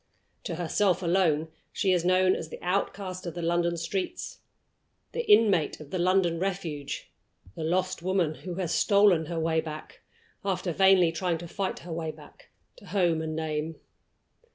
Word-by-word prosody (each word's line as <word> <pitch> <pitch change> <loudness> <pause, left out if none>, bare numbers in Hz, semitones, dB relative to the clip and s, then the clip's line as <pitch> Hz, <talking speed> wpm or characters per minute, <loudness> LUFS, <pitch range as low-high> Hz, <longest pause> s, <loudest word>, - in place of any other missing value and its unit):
To 175 - -3
herself 180 +2 +1
alone 170 -3 +2 0.2
she 190 - +1
is 175 -2 +1
known 185 +1 +4
as 160 - -6
the - - -7
outcast 185 0 -2
of 170 - -5
the 175 - -4
London 170 0 +1
streets; 190 - -4 0.7
the 475 -3 -1
inmate 200 - +4
of 150 -2 -11
the 185 - -2
London 175 -2 +2
Refuge; 170 -7 -4 0.4
the 160 - -5
lost 185 +2 0
woman 180 -3 +1
who 180 +2 -7
has 175 -3 -2
stolen 200 -6 +4
her 170 0 -3
way 160 0 +1
back 155 -1 -9 0.4
after 185 -2 -1
vainly 190 -2 +5
trying 170 0 -1
to 170 +1 -8
fight 195 +2 -3
her 175 - -5
way 160 -1 -3
back - - -13 0.3
to - - -15
Home 175 -5 +1
and 160 0 -3
Name. 160 0 -2
175 Hz, 165 wpm, -28 LUFS, 160-190 Hz, 0.7 s, vainly